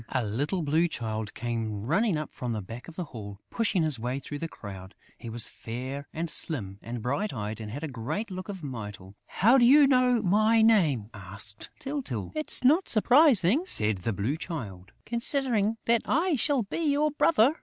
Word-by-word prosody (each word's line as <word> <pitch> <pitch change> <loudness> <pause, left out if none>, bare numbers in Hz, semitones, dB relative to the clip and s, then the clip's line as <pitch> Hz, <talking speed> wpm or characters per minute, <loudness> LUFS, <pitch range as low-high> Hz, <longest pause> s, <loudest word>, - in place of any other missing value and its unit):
A 130 -3 -1
little 145 - -1
Blue 160 +4 +2
Child 110 -7 -4
came 110 -3 -3
running 200 - +1
up 150 -1 -5
from 125 -2 -4
the 110 - -3
back 115 +6 -9
of 170 - -11
the 180 - -3
hall, 105 - -9
pushing 205 -7 +1
his 150 -6 0
way 125 +3 -2
through 145 +2 -6
the 165 - -3
crowd. 95 - -10 0.2
He 115 - -9
was 115 0 0
fair 130 +5 -6
and 165 +2 -3
slim 105 - -2
and 115 -1 -6
bright 140 - -1
eyed 105 0 -4
and 105 - -6
had 140 +8 -6
a - - -2
great 140 - -4
look 185 +2 -6
of 190 -4 -7
Mytyl. 105 -7 -7
"How 235 +8 +4
do - - +4
you 280 +4 +7
know 255 -2 +3
my 215 +4 +4
name?" 155 - +3
asked 100 +1 -9
Tyltyl. 270 - -4
"It's 310 -3 +2
not 310 +9 +4
surprising," 245 - +5
said 105 - +3
the 105 +6 -2
Blue 110 - -2
Child, 100 - -7
"considering 235 -3 0
that 230 -1 +3
I 335 +3 +1
shall 275 0 +1
be 200 - -5
your 300 -1 +2
brother!" 280 -3 +4
150 Hz, 190 wpm, -27 LUFS, -, 0.2 s, you